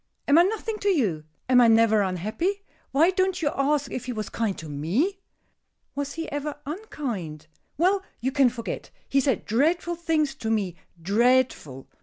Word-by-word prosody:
Am 285 - +5
I - - +9
nothing 430 +3 -1
to 405 - +1
you? 200 - +1 0.2
Am 250 -1 +6
I 240 - +6
never 225 -1 +5
unhappy? 215 - -2 0.3
Why 320 +6 +4
don't 375 0 0
you 290 - +2
ask 285 +1 0
if 250 - -4
he 250 - -3
was 215 -3 -4
kind 220 -4 -2
to 160 - -8
me?" 190 - -1 0.7
"Was 285 0 -4
he 330 0 -5
ever 290 +1 -3
unkind?" 245 - -5 0.3
"Well, 375 +5 +3 0.2
you 260 +3 -1
can 270 -2 +4
forget! 235 -1 -6 0.2
He 275 - +2
said 265 -4 0
dreadful 325 +9 +1
things 320 -4 0
to 240 -5 -5
me 200 -6 0 0.2
dreadful. 210 - +1
265 Hz, 170 wpm, -25 LUFS, 215-325 Hz, 0.7 s, I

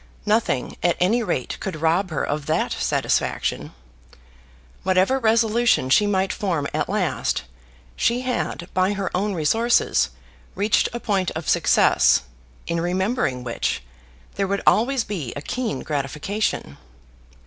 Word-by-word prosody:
Nothing 210 - 0
at 175 - +2
any 215 +7 +3
rate 175 - -2
could 190 - -4
rob 170 +5 +1
her 155 - -2
of 145 0 -3
that - - 0
satisfaction. - - -1 1.1
Whatever 190 +8 +2
resolution 225 - +2
she 205 +8 +5
might 190 -1 +1
form 170 -8 -1
at - - -1
last, - - -1 0.5
she 240 +2 +1
had 250 -8 -3
by 185 +2 +2
her 195 -3 -3
own 200 +2 0
resources 225 +10 +2 0.5
reached 205 +3 +2
a 240 - -4
point 195 -6 0
of 160 0 -5
success - - +4 0.4
in 170 0 -1
remembering 180 - -1
which 120 - -2 0.5
there 195 - +1
would 200 +1 -2
always 250 +2 +3
be 170 - -5
a 145 - -5
keen 230 - -3
gratification. 150 - -2
190 Hz, 130 wpm, -23 LUFS, 160-220 Hz, 1.1 s, she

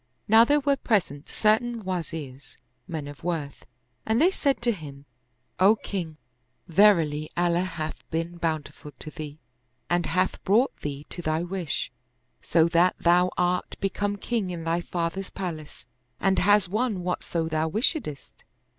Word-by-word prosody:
Now 225 +2 +8
there 290 +5 +3
were 280 0 +2
present 160 - 0
certain 225 +1 +1
Wazirs, 160 -7 -5 0.3
men 160 -5 -4
of 145 -1 -10
worth, 160 -5 -4 0.4
and 220 +2 +1
they 345 +5 +5
said 280 -7 0
to 240 - +3
him, 145 -8 -8 0.5
"O 195 +4 +6
king, 175 -7 -5 0.5
verily 165 -5 +4
Allah 175 0 +2
hath' 165 -4 -4
been 165 +2 -3
bountiful 155 -3 -4
to 155 - -8
thee 150 -1 -7 0.5
and 175 0 +2
hath 185 +2 0
brought 230 +8 +3
thee 145 0 -5
to 175 - -5
thy 155 0 0
wish, 175 -8 -3 0.5
so 165 -1 +3
that 170 +2 +4
thou 180 +1 +4
art 180 0 0
become 205 +1 -1
king 210 -1 -2
in 170 -2 -5
thy 165 +1 0
father's 175 +2 -3
palace 160 -8 -6 0.3
and 190 -1 +2
hast 205 0 +4
won 210 -1 -1
whatso 175 -2 -2
thou 160 0 0
wishedst. 215 - -2
175 Hz, 145 wpm, -26 LUFS, 155-205 Hz, 0.5 s, Now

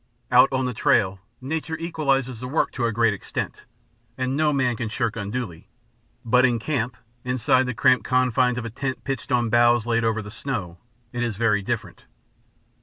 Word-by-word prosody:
Out 125 +2 +6
on 130 -1 0
the 125 - -2
trail, 95 -3 +2 0.2
nature 160 +4 -3
equalizes 135 -7 -1
the 125 - -5
work 145 +5 0
to 120 - -2
a 115 - +1
great 115 -1 +2
extent, 100 - -5 0.5
and 130 +1 -1
no 150 0 +2
man 130 -4 +1
can 115 0 -4
shirk 115 -1 -1
unduly, 105 -5 -5 0.6
but 125 +2 +4
in 125 -2 +3
camp, 125 -1 -2 0.3
inside 125 +1 +2
the 125 - -3
cramped 130 -2 +4
confines 125 -1 +2
of 120 - -4
a 115 - -5
tent 130 +3 -4
pitched 135 -1 -4
on 120 -2 +1
boughs 120 -1 +4
laid 115 -1 +1
over 110 -1 0
the 105 - -9
snow, 100 -9 -5 0.3
it 120 - -3
is 120 -3 -1
very 105 -1 +2
different. 105 -4 -4
120 Hz, 185 wpm, -24 LUFS, 115-130 Hz, 0.6 s, Out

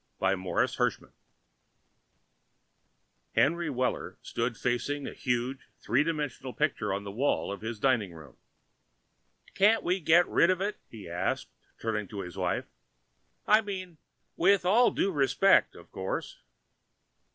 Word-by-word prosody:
By 95 0 +2
Morris 90 -1 -1
Hershman - - -1 2.2
Henry 170 +2 +2
Weller 130 -2 -2
stood 115 0 -2
facing 130 +4 -1
a - - -6
huge 125 +1 -2
three - - +2
dimensional 145 -5 -3
picture 140 -9 -1
on 100 +1 -2
the 100 - -6
wall 125 0 0
of 100 - -6
his 110 +1 -4
dining 110 -5 +1
room. 75 -6 -13 1.2
"Can't 215 +3 +4
we 180 +2 +1
get 170 +1 +4
rid 170 - +3
of 185 -1 +2
it?" 205 +2 -2
he 110 -5 -10
asked, 85 +2 -2 0.3
turning 105 -2 -2
to 100 0 -6
his 90 -3 -8
wife. - - -1 0.8
"I 215 +1 +5
mean, 185 -6 -6 0.4
with 190 +1 +3
all 230 +7 +5
due 195 - 0
respect, 140 -5 +3
of - - -15
course." 95 0 -4
135 Hz, 135 wpm, -29 LUFS, 105-175 Hz, 2.2 s, I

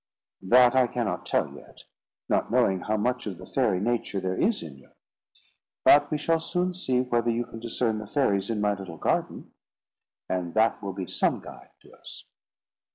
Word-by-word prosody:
"That 120 +5 +5
I 130 -1 +4
cannot 120 -2 -3
tell - - 0
yet, - - -15 0.4
not - - 0
knowing 110 -5 +2
how 110 +4 -1
much 125 +2 -1
of 95 -4 -5
the - - -11
fairy 115 -9 +1
nature 115 -2 -1
there 95 0 -2
is 225 - +1
in 70 -4 -10
you. 65 - -21 1.0
But 145 - +6
we 150 - 0
shall 165 +2 +1
soon 180 +2 -1
see 130 -9 0
whether 120 -2 0
you 120 +1 0
can 115 - -10
discern 115 -1 -1
the 110 - -8
fairies 100 -7 +1
in 110 -2 -1
my 105 0 +2
little 95 -5 -8
garden, - - -2 0.8
and 90 -1 -3
that 110 +1 +2
will 100 -1 -4
be 95 -1 -5
some - - 0
guide - - -12
to - - -19
us." - - -11
115 Hz, 185 wpm, -26 LUFS, 95-125 Hz, 1.0 s, But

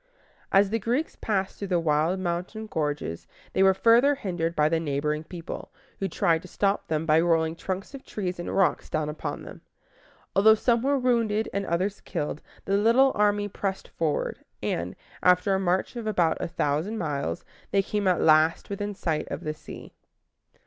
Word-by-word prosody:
As 195 +1 +4
the 225 - +1
Greeks 245 +9 -1
passed 195 -3 -2
through 200 - -4
the 180 -2 +2
wild 160 +3 +1
mountain 180 +5 -3
gorges, 150 - -3 0.3
they - - +2
were 190 0 +6
further 240 +8 +5
hindered 175 -7 -2
by 150 0 +4
the 165 +1 +1
neighboring 150 0 -1
people, 170 +1 -8 0.3
who 195 - 0
tried 165 -2 +1
to - - -11
stop 200 0 0
them 155 0 -1
by 155 0 +4
rolling 165 -1 +2
trunks 190 +7 -5
of 275 - -9
trees 185 -4 -4
and 175 - -4
rocks 195 -2 +2
down 155 -2 -1
upon 150 - -5
them. - - -11 0.7
Although 220 +3 +7
some 235 +1 +2
were 280 +2 +2
wounded 230 -4 +1
and 200 0 -2
others 185 +4 -1
killed, 150 +1 -4 0.2
the 195 +1 +2
little 235 +6 +5
army 205 0 +2
pressed 195 -1 -4
forward, 160 -3 -2 0.2
and, 85 +2 -2 0.3
after 180 +2 +4
a 190 - +2
march 185 +4 0
of 235 -2 -5
about 175 -6 +2
a - - -2
thousand 165 +5 -1
miles, 150 -2 -3 0.2
they 195 -1 +2
came 205 0 -1
at 180 -3 +3
last 155 +4 +4
within 205 0 -3
sight 160 -5 -2
of - - -5
the 155 - -2
sea. 155 - -11
185 Hz, 180 wpm, -26 LUFS, 160-205 Hz, 0.7 s, Although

